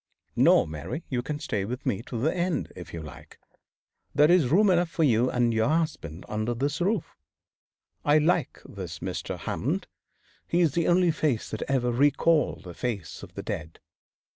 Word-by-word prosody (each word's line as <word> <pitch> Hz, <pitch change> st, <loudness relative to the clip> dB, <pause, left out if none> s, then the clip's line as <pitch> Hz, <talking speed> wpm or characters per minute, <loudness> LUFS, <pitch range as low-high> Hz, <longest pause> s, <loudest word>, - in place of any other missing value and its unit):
No, -, -, +5 dB
Mary, 80 Hz, -, -6 dB
you 125 Hz, -3 st, -1 dB
can 145 Hz, +4 st, -4 dB
stay 105 Hz, -8 st, -2 dB
with 120 Hz, +5 st, -5 dB
me 100 Hz, -, 0 dB
to 120 Hz, -, -4 dB
the 155 Hz, +9 st, +1 dB
end, 175 Hz, -1 st, -1 dB
if 85 Hz, -2 st, -9 dB
you 85 Hz, -1 st, -6 dB
like. 75 Hz, -3 st, -12 dB, 0.8 s
There 150 Hz, +3 st, +6 dB
is 175 Hz, -7 st, +5 dB
room 195 Hz, +6 st, +5 dB
enough 175 Hz, -1 st, +2 dB
for 165 Hz, -1 st, 0 dB
you 125 Hz, -3 st, +3 dB
and 120 Hz, -2 st, +1 dB
your 110 Hz, +4 st, +2 dB
husband 155 Hz, -, -2 dB
under 110 Hz, +3 st, -2 dB
this 145 Hz, +6 st, -1 dB
roof. 200 Hz, +4 st, 0 dB, 0.9 s
I 145 Hz, +1 st, +5 dB
like 155 Hz, -1 st, +1 dB
this 90 Hz, -4 st, -7 dB
Mr. 90 Hz, +2 st, -4 dB
Hammond. -, -, -2 dB, 0.6 s
His 170 Hz, -1 st, +3 dB
is -, -, -13 dB
the 170 Hz, 0 st, +1 dB
only 175 Hz, -1 st, +4 dB
face 150 Hz, -7 st, -1 dB
that 110 Hz, -, -4 dB
ever 125 Hz, -3 st, +1 dB
recalled 145 Hz, +5 st, +2 dB
the 90 Hz, -, -8 dB
face 105 Hz, -4 st, -4 dB
of -, -, -12 dB
the -, -, -5 dB
dead. 80 Hz, +2 st, -5 dB
135 Hz, 180 wpm, -27 LUFS, 110-165 Hz, 0.9 s, There